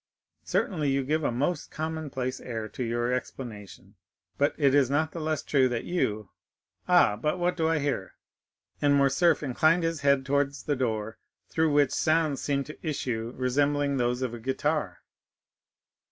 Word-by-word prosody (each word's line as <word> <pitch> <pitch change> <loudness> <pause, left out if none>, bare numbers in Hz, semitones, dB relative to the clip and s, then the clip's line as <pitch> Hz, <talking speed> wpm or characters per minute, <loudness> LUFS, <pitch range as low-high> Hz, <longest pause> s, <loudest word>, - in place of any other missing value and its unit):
"Certainly 155 -8 0
you 135 0 +1
give 155 +4 0
a - - +1
most 145 +7 -1
commonplace 150 -5 -4
air 110 -3 -5
to 125 - -5
your 120 +1 -1
explanation, 105 -6 -7 0.4
but 145 +1 +1
it 140 -3 +3
is 140 -3 +4
not 155 +3 +1
the 170 - -6
less 155 -1 -2
true 130 -3 +3
that 120 -2 -2
you——Ah, 110 - 0
but 150 +8 -1
what 175 0 0
do 160 -2 +1
I 165 - +2
hear?" 140 -10 -2 0.7
and 145 -1 +4
Morcerf 140 +4 +3
inclined 155 +5 +2
his 165 -2 -1
head 140 -1 +3
towards 140 0 0
the 145 - 0
door, 110 -4 -2 0.3
through 160 -1 +1
which 145 -2 +3
sounds 155 -2 +1
seemed 140 -1 -1
to 155 - -10
issue 120 -7 -3
resembling 140 +2 +1
those 125 +1 0
of 125 -2 -2
a 120 - -6
guitar. 130 - -2
140 Hz, 160 wpm, -27 LUFS, 125-155 Hz, 0.7 s, is